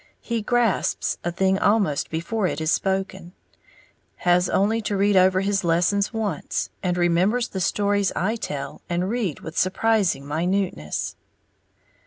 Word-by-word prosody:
He 235 -2 -2
grasps 235 -2 0
a 175 - -1
thing 190 +2 +1
almost 200 -9 +1
before 185 +6 -1
it 160 - -3
is 160 +1 0
spoken, 190 -2 -2 0.8
has 180 0 +2
only 220 +4 +1
to 205 -1 -2
read 200 +1 +3
over 185 0 +4
his 195 0 0
lessons 175 +4 +1
once, 215 -8 -3
and 180 -1 -1
remembers 180 +8 +2
the 190 - -4
stories 200 +1 +1
I 215 +6 0
tell 145 -11 -5
and 180 +3 -1
read 220 - -2
with 160 - -8
surprising 190 -5 +1
minuteness. 165 - -2
190 Hz, 140 wpm, -23 LUFS, 175-205 Hz, 0.8 s, over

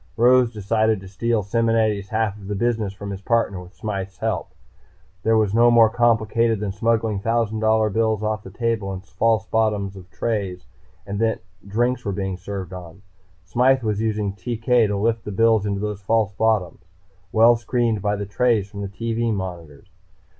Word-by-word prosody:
Rose 125 0 +5
decided 110 0 +1
to 95 - -11
steal 110 +3 -1
Simonetti's 110 -2 +1
half 110 -2 0
of 100 -2 -11
the 105 - -3
business 110 -1 0
from 100 0 -7
his 95 -1 -6
partner 100 -4 0
with 90 +2 -14
Smythe's 95 -3 -5
help. - - -2 0.7
It 115 - +3
was 110 -3 +2
no 120 +2 +5
more 115 -2 +6
complicated 115 -1 +2
than 105 -1 -2
smuggling 110 0 0
thousand 115 0 0
dollar 110 -1 +2
bills 110 0 0
off 110 0 -1
the 95 - -11
table 115 -1 -2
in 95 - -6
false 110 +4 0
bottoms 105 -3 0
of 90 -2 -12
trays 100 -4 -3 0.4
that 110 +3 -1 0.3
drinks 120 +4 0
were 100 - -2
being 95 -1 -3
served 95 0 -6
on. 90 +1 -10 0.4
Smythe 125 +8 +2
was 105 -1 -1
using 105 -3 -1
TK 115 +3 +1
to 100 0 -1
lift 115 +2 0
the 105 - -6
bills 110 0 +3
into 100 -1 -1
those 105 -1 -4
false 110 0 +1
bottoms, 100 -5 0 0.5
well 115 +2 +6
screened 115 -2 0
by 105 +1 0
the 100 0 -4
trays 110 0 +1
from 100 0 -8
the 100 - -3
TV 115 +3 -2
monitors. 90 -5 -6
110 Hz, 175 wpm, -22 LUFS, 100-115 Hz, 0.7 s, more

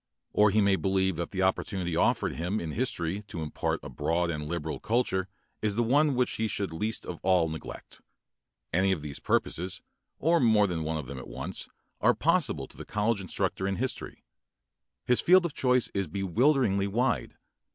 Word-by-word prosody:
Or 105 0 +5
he 105 +2 +3
may 100 -1 +3
believe 95 -2 +1
that 85 - -3
the 95 -1 -1
opportunity 95 -2 0
offered - - +2
him 90 +6 -1
in 80 -2 -4
history 100 -4 -1
to 85 -4 -5
impart 75 - -2
a - - -7
broad 85 +1 0
and 75 -2 -4
liberal 80 -2 -3
culture 105 -5 0 0.3
is 105 -2 0
the 120 - +2
one 140 +4 +3
which 125 0 +1
he 110 - 0
should 100 -5 -2
least 110 +7 -2
of 85 - -6
all 90 -3 +3
neglect. 80 0 -8 0.7
Any 95 +3 +3
of 80 -5 -5
these 75 -2 -5
purposes, 90 +3 -1 0.3
or 165 +2 +3
more 110 -4 +5
than 85 -4 -2
one 80 +1 -2
of 75 - -5
them 65 +1 -7
at - - -9
once, - - -5 0.3
are - - +4
possible - - +1
to - - -17
the - - -7
college 105 0 0
instructor 95 +1 -1
in 100 - 0
history. 130 +4 -4 0.8
His 125 - +3
field 180 0 +6
of 165 - -2
choice 125 -2 +2
is 100 -2 -1
bewilderingly 100 - +2
wide. 120 +4 0
95 Hz, 185 wpm, -28 LUFS, 85-115 Hz, 0.8 s, field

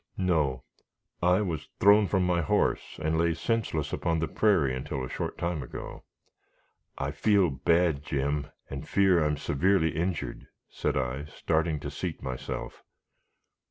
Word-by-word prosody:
"No; 75 -9 +1 0.6
I 90 +3 +4
was 85 -7 -3
thrown 100 +1 +6
from 95 -2 +1
my 90 -1 +2
horse, 75 - 0
and 80 +1 +1
lay 85 -1 +2
senseless 85 -5 -1
upon 85 -1 0
the 80 0 0
prairie 85 -13 +2
until 65 +1 -4
a - - -8
short - - -4
time 85 -3 -2
ago. 65 - -8 0.9
I 70 +1 -2
feel 95 +2 +3
bad, 85 +2 +2
Jim, 70 -1 -1 0.2
and 70 0 -7
fear 95 -4 +4
I - - +2
am 75 -1 0
severely 80 +4 +2
injured," 85 +1 -3 0.2
said - - -1
I, 65 +2 -2
starting 80 0 -1
to - - -5
seat - - -5
myself. 65 +1 -5
80 Hz, 150 wpm, -28 LUFS, 70-90 Hz, 0.9 s, thrown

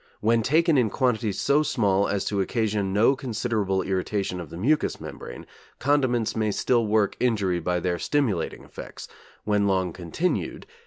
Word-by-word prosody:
When 115 +2 +2
taken 155 +4 +3
in 115 -3 +2
quantities 110 -4 0
so 140 +7 +3
small 100 -9 +1
as 100 -1 -1
to 100 -2 0
occasion 105 -2 -1
no 110 +7 +4
considerable 110 -7 -1
irritation 95 0 -2
of 85 - -7
the - - -8
mucous 145 - +1
membrane, - - -9 0.3
condiments 130 -5 +1
may 110 -1 0
still 115 +2 +1
work 105 -1 +2
injury 100 -8 +1
by 90 +1 -1
their 90 -2 -1
stimulating 120 - -1
effects, - - -10 0.4
when 105 -1 +1
long 95 -3 0
continued.... 90 - -3
105 Hz, 155 wpm, -25 LUFS, 95-125 Hz, 0.4 s, no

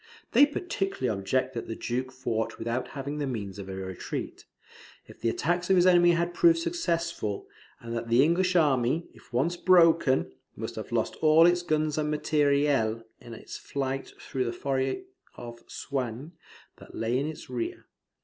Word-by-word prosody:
They 290 - +7
particularly 195 - -2
object 130 +7 -1
that 115 - -5
the 115 - -4
Duke 130 +2 -3
fought 115 -4 -3
without 120 +2 -2
having 140 +2 -4
the 145 - -1
means 100 -6 -5
of 95 -1 -7
a 95 - -5
retreat, 95 -1 -6 0.6
if - - -16
the 115 - +1
attacks 175 +9 -1
of 190 - +5
his 180 -1 +5
enemy 175 -1 +6
had 170 +1 0
proved 335 - +5
successful; 170 - -2 0.3
and 115 0 -6
that 115 0 -3
the 120 +3 +5
English 180 +4 +2
army, 145 -1 +2
if - - -20
once 135 +9 +1
broken, 165 - +4 0.2
must - - -5
have - - -7
lost - - -1
all 155 +1 +6
its 175 0 +4
guns 155 -2 0
and 150 0 0
MATERIEL 145 -6 +1 0.2
in 115 -1 -10
its - - -9
flight 135 -1 -4
through 130 -1 -3
the 115 - -2
Forest 135 - -1 0.3
of 120 -1 -9
Soignies, 130 +2 -4 0.5
that - - -14
lay 115 +3 0
in 140 - -1
its 155 - -7
rear. 125 -2 -4
140 Hz, 170 wpm, -28 LUFS, 120-170 Hz, 0.6 s, They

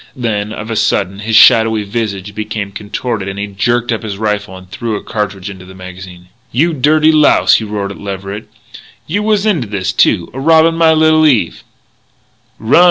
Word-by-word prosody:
Then, 110 -4 -2
of 110 +1 -6
a - - -2
sudden, 100 -2 0
his 110 +1 -2
shadowy 110 -2 +5
visage 100 -2 -4
became 105 -1 -5
contorted 105 +1 -4
and 95 0 -5
he 100 - -3
jerked 120 +5 -1
up 115 - -2
his 105 -3 -6
rifle 105 -2 -3
and 95 0 -14
threw 110 +4 -4
a - - -6
cartridge 100 -3 -4
into 95 -2 -9
the 95 +1 -13
magazine. 90 -1 -11 0.2
"You 165 +7 +1
dirty 155 +3 +3
louse!" 155 -1 +4
he 110 - -4
roared 100 -2 -4
at - - -10
Leverett, 100 +1 -6 0.6
"you 200 +7 -2
was 210 -1 +1
into 170 - 0
this, 100 -2 -2
too, 90 -3 +1
a 130 - -6
robbin' 160 +3 +4
my 165 -1 +3
little 155 0 +4
Eve 115 - 0 0.5
" - - -41
"Run!" 110 +8 +3
105 Hz, 190 wpm, -14 LUFS, 100-130 Hz, 0.6 s, shadowy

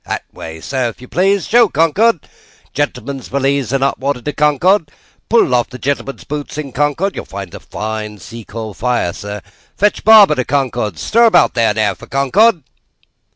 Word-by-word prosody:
That - - -3
way, 80 0 -9
sir, 130 +2 -2
if 115 - -12
you 125 - -12
please. 195 +5 +1
Show 235 0 +4
Concord! 165 +5 +2 0.5
Gentleman's 135 -2 -3
valise 135 -1 -1
and 135 -1 0
hot 140 - 0
water 140 0 -1
to 145 +4 -5
Concord. 150 +4 +2 0.4
Pull 225 - +3
off 120 -1 +1
gentleman's 135 0 -3
boots 145 0 -6
in 145 -3 -5
Concord. 145 +9 0
(You - - -4
will - - -16
find 95 -2 -8
a - - -8
fine 105 -1 -5
sea 115 +4 -10
coal 110 0 -7
fire, 120 -5 -1
sir.) 105 0 -7 0.3
Fetch 210 +1 +1
barber 215 -6 +7
to 130 - -1
Concord. 125 -5 -1
Stir 235 +2 +3
about 195 -7 +4
there, 115 -2 +1
now, 105 -2 +1
for - - -14
Concord!" 165 - +2
140 Hz, 180 wpm, -16 LUFS, 115-165 Hz, 0.5 s, barber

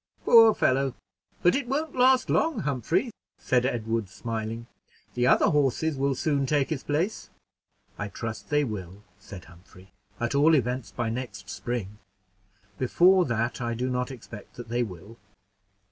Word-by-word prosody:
"Poor 225 -2 +7
fellow! 135 0 +1 0.5
but 175 - +5
it 270 -2 -1
won't 290 +3 -2
last 255 0 +4
long, 320 -1 +1
Humphrey," 155 - -1 0.3
said 125 0 +1
Edward, 115 -4 -2
smiling; 115 +2 -5 0.5
"the 125 0 +1
other - - +5
horses 150 +1 +1
will 135 0 0
soon 140 -1 0
take 145 0 +1
his 145 -4 -2
place." 165 +9 -2 0.7
"I 100 - -2
trust 110 0 -6
they 150 0 +2
will," 100 -5 -6 0.2
said 95 -2 -11
Humphrey, 90 +3 -18 0.3
"at 120 +2 -1
all 150 +3 +5
events 125 -2 -1
by 120 -2 -3
next 105 -5 -6
spring; 105 -4 -5 0.8
before 180 +8 +4
that 115 +1 -2
I 120 -1 -2
do 125 +2 -2
not 125 0 -1
expect 120 -5 -11
that 120 -2 -9
they 120 +1 0
will." 105 +1 -7
125 Hz, 150 wpm, -26 LUFS, 110-150 Hz, 0.8 s, Poor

